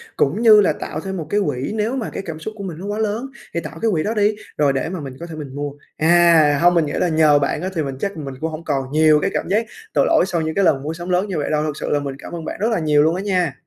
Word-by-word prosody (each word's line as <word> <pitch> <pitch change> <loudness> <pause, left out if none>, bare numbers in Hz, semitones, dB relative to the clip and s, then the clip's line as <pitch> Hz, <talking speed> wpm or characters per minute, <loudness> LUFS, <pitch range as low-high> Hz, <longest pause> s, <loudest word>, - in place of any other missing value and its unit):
cũng 155 +11 +1
như 215 -3 +8
là 195 - +2
tạo - - -6
thêm 190 -1 -5
một 160 - -5
cái 205 - +1
quỹ 135 -3 -2
nếu 220 +4 -1
mà 245 -5 -3
cái - - -4
cảm 160 -2 -6
xúc 215 +7 -6
của 200 - -6
mình 175 -5 -6
nó 190 - -7
quá 205 +1 -3
lớn, 220 +3 -1 0.3
thì 170 - 0
tạo 165 -1 -8
cái 225 - +2
quỹ 160 -5 0
đó 215 - -1
đi, 210 -1 +2 0.2
rồi 145 -2 +3
để 135 +3 -2
mà 185 0 -4
mình 135 -3 -8
có 170 - -6
thể 165 -2 -8
mình 145 -3 -8
mua. 145 0 -3 0.3
À, 160 -3 +5
hông, 175 +1 +5
mình 170 -2 +3
nghĩ 145 - -4
là - - +1
nhờ 155 -2 +4
bạn 145 +2 -1
á, 185 - -2
thì 160 - 0
mình 135 -2 -5
chắc 200 +1 -3
mình 140 -3 -6
cũng 160 0 -2
hổng 155 +1 -7
còn 135 -5 -2
nhiều 155 0 +5
cái - - +1
cảm - - -2
giác 215 +4 +2 0.3
tội - - +3
lỗi 325 - +4
sau 170 -3 -1
những 160 0 -3
cái 200 - +2
lần 140 -6 +2
mua 155 +2 -3
sắm 175 +2 -7
lớn 180 +3 +1
như 190 -4 -3
vậy 145 - -2
đâu, 150 0 +1
thực 155 -1 -2
sự - - -3
là 145 - +2
mình 140 -1 -5
cảm - - -10
ơn 165 -2 -6
bạn - - -5
rất 215 +3 +1
là 220 - +1
nhiều 150 -2 +3
luôn 160 +2 +2
á 185 - -3
nha. 180 -7 0
165 Hz, 335 wpm, -20 LUFS, 150-195 Hz, 0.3 s, như